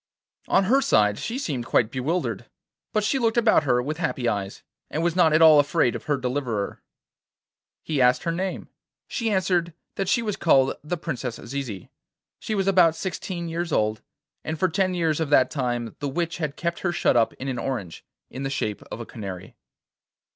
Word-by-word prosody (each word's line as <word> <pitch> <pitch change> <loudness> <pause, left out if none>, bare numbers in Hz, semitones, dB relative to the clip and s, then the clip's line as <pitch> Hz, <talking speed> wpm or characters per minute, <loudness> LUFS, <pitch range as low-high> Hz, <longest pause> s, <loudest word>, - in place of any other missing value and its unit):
On 190 - +4
her 260 +8 +3
side 105 - +3
she 235 - -3
seemed 135 - -3
quite 115 -1 +2
bewildered, 150 +8 -2 0.4
but 215 -2 +1
she 265 +6 +1
looked 230 -1 +1
about 220 -9 +4
her 125 -2 +2
with 150 +3 -3
happy 150 -7 -1
eyes, 100 -3 -3 0.3
and 160 - -2
was 170 0 +1
not 175 -3 +5
at 155 +1 +5
all 155 -2 +8
afraid 145 -3 +2
of - - -7
her 145 -1 +1
deliverer. 125 -5 -3 1.0
He 150 -4 -1
asked 125 0 +4
her 170 - 0
name. 185 +2 -3 0.4
She 230 -3 -2
answered 180 -4 +1 0.2
that 195 -2 -1
she 230 +5 +2
was 210 -3 -2
called 135 -5 +3
the 175 +4 -3
Princess 130 -8 -4
Zizi; 120 -7 -6 0.5
she 215 - -3
was 195 -2 0
about 180 -4 +5
sixteen 180 -1 -4
years 165 +1 -3
old, 110 -4 +1 0.4
and 160 +1 -3
for 185 +3 +2
ten 185 +1 0
years 165 -3 +1
of 160 -3 -1
that 130 -3 +4
time 120 -5 -2
the 145 - -2
witch 170 +4 -2
had 150 -4 -3
kept 170 0 -2
her 175 - 0
shut 170 - +2
up 115 -2 +3
in 135 - -6
an 130 -2 -2
orange, 110 -11 -4 0.3
in 130 - -6
the 135 - -2
shape 110 -6 -2
of - - -5
a - - -6
canary. 95 -5 -8
155 Hz, 195 wpm, -24 LUFS, 125-180 Hz, 1.0 s, all